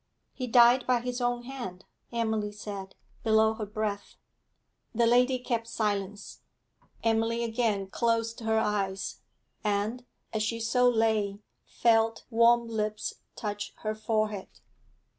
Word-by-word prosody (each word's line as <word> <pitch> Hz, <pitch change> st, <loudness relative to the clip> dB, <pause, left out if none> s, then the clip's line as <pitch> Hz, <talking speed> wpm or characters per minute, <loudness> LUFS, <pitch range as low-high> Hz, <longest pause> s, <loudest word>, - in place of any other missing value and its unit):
'He 255 Hz, -2 st, -4 dB
died 240 Hz, +1 st, +6 dB
by 250 Hz, -2 st, +3 dB
his 250 Hz, +1 st, -3 dB
own 245 Hz, 0 st, 0 dB
hand,' 240 Hz, -8 st, -7 dB, 0.3 s
Emily 220 Hz, -3 st, -1 dB
said, 200 Hz, -2 st, -7 dB, 0.3 s
below 220 Hz, 0 st, +4 dB
her 220 Hz, -1 st, -5 dB
breath. 210 Hz, -1 st, -3 dB, 0.8 s
The 235 Hz, +1 st, +4 dB
lady 250 Hz, +2 st, +4 dB
kept 235 Hz, -2 st, -2 dB
silence. 205 Hz, -2 st, -3 dB, 0.6 s
Emily 225 Hz, +1 st, +1 dB
again 225 Hz, -4 st, 0 dB
closed 230 Hz, +3 st, 0 dB
her 220 Hz, -1 st, +1 dB
eyes, 200 Hz, -3 st, -1 dB, 0.5 s
and, 210 Hz, +4 st, -1 dB, 0.3 s
as 215 Hz, -, 0 dB
she 230 Hz, +2 st, -1 dB
so 245 Hz, +2 st, +3 dB
lay, 220 Hz, -4 st, +1 dB, 0.3 s
felt 225 Hz, -1 st, +2 dB
warm 235 Hz, +1 st, +5 dB
lips 215 Hz, -1 st, -2 dB, 0.2 s
touch 205 Hz, -1 st, -4 dB
her 215 Hz, 0 st, 0 dB
forehead. 215 Hz, -2 st, -1 dB
225 Hz, 120 wpm, -29 LUFS, 210-235 Hz, 0.8 s, died